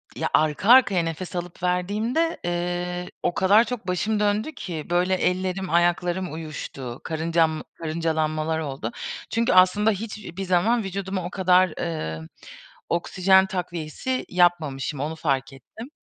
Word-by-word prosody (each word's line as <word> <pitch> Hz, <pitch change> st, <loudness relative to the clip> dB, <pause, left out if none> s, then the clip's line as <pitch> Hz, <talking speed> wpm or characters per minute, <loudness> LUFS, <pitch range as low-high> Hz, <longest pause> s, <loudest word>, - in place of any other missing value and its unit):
ya -, -, -2 dB
arka 155 Hz, +6 st, +2 dB
arkaya 235 Hz, -8 st, +6 dB
nefes 165 Hz, +3 st, -5 dB
alıp 175 Hz, 0 st, -6 dB
verdiğimde, 210 Hz, -, 0 dB
eee, 175 Hz, 0 st, -2 dB
o -, -, +1 dB
kadar 200 Hz, +5 st, +5 dB
çok 240 Hz, -5 st, -6 dB
başım 210 Hz, +4 st, 0 dB
döndü 210 Hz, +7 st, +1 dB
ki 165 Hz, -, -6 dB
böyle 180 Hz, +2 st, +2 dB
ellerim 185 Hz, +1 st, -1 dB
ayaklarım 175 Hz, +1 st, +1 dB
uyuştu. 140 Hz, -6 st, -7 dB
Karıncam 160 Hz, 0 st, 0 dB
karıncalanmalar 160 Hz, -1 st, -1 dB
oldu. 135 Hz, -7 st, -4 dB, 0.4 s
Çünkü 230 Hz, -2 st, +1 dB
aslında 185 Hz, +4 st, +5 dB
hiçbir 205 Hz, -3 st, -6 dB
zaman 210 Hz, +6 st, +2 dB
vücuduma 190 Hz, -1 st, -4 dB
o -, -, -3 dB
kadar, 185 Hz, -2 st, +3 dB
eee, 80 Hz, -, -3 dB, 0.7 s
oksijen 190 Hz, +2 st, +3 dB
takviyesi 180 Hz, +6 st, -3 dB
yapmamışım. 155 Hz, -6 st, +1 dB
Onu 155 Hz, +3 st, -3 dB
fark 135 Hz, -4 st, -1 dB
ettim. 220 Hz, -, -11 dB
180 Hz, 125 wpm, -24 LUFS, 160-195 Hz, 0.7 s, arkaya